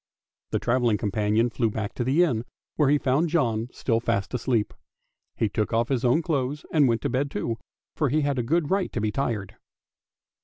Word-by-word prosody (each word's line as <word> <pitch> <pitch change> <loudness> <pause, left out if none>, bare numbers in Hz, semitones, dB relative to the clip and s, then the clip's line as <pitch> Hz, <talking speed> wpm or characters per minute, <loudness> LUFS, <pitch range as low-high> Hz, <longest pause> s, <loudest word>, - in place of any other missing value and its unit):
The - - 0
travelling 120 -3 +1
companion 105 +3 +1
flew 115 0 +1
back 105 -1 -4
to 120 - -2
the 140 +8 +3
inn, 120 -10 0 0.3
where 150 -3 +3
he 145 - +5
found 145 +5 +1
John 120 -8 0
still 115 -3 0
fast 100 -3 -1
asleep. 120 -3 0 0.6
He 110 - +1
took 105 +2 -2
off 115 +1 +1
his 130 -3 0
own 130 +7 +3
clothes 145 -2 -2
and 150 -4 +5
went 115 -1 +1
to - - 0
bed 140 +3 0
too, 115 -1 -3 0.4
for 150 -4 +1
he 155 +4 +2
had 140 -4 0
good 165 +2 +1
right 195 -1 +1
to - - -1
be 105 0 0
tired. 110 -5 -3
125 Hz, 195 wpm, -25 LUFS, 110-145 Hz, 0.6 s, he